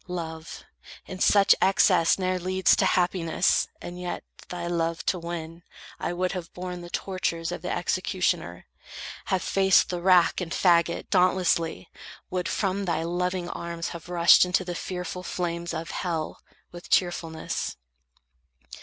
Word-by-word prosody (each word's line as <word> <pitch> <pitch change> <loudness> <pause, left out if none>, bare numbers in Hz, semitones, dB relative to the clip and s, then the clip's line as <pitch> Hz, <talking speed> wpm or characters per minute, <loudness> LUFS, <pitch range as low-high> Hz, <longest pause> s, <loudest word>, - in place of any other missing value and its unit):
Love 165 -2 -6 0.4
In 185 - -8
such 200 +1 +6
excess 185 -3 +4
ne'er 185 -1 -1
leads 185 +1 +3
to - - +2
happiness. 180 -1 +2
And 175 +1 -8
yet, 180 - -4 0.3
thy 175 -1 -5
love 165 -1 -1
to 180 - 0
win, 170 0 -6 0.4
I - - -2
would 180 +1 -1
have 180 -3 -6
borne 180 0 -5
The 175 - -9
tortures 175 -3 -2
of 175 - -5
the 180 - -4
executioner; 175 - -1 0.6
Have 190 -1 0
faced 190 -1 +3
the 175 -1 -3
rack 180 -1 +4
and 170 -2 -5
fagot, 170 -1 +2
dauntlessly; 180 - +2 0.4
Would 180 -1 -1
from 195 0 -1
thy 170 -2 -1
loving 180 +1 -2
arms 170 -1 -5
have 170 0 -9
rushed 170 -1 +6
into 180 +1 0
The 175 - -4
fearful 180 0 -5
flames 170 -1 -3
of 165 0 -5
hell, 165 -4 -3 0.3
with 175 0 -11
cheerfulness. 165 -3 -1
175 Hz, 145 wpm, -26 LUFS, 170-185 Hz, 0.6 s, such